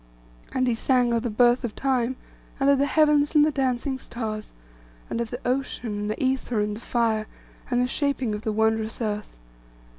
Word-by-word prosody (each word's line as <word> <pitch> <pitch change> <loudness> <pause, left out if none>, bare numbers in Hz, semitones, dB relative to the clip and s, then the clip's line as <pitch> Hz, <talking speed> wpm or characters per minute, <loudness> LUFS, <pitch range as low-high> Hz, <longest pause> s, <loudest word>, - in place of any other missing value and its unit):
And 260 -1 +1
he 245 - +2
sang 245 +1 +2
of 230 - +1
the 240 - -2
birth 240 +3 +3
of 235 -3 -4
Time, 260 -2 0 0.4
and 275 +1 +4
of 280 - +3
the 280 - +3
heavens 300 -1 +3
and 300 0 +7
the 310 - +2
dancing 265 -1 -1
stars; 220 -4 -5 0.6
and 235 - -1
of 230 - -3
the 245 - -5
ocean, 250 -2 -1
and 205 0 -3
the 215 - -2
ether, 260 -3 0
and 210 0 -1
the - - -8
fire, 225 -3 0 0.4
and 245 -2 +1
the 250 - +3
shaping 265 -3 -1
of 210 - -4
the 220 - -1
wondrous 220 0 0
earth. 210 - -3
245 Hz, 200 wpm, -25 LUFS, 220-265 Hz, 0.6 s, and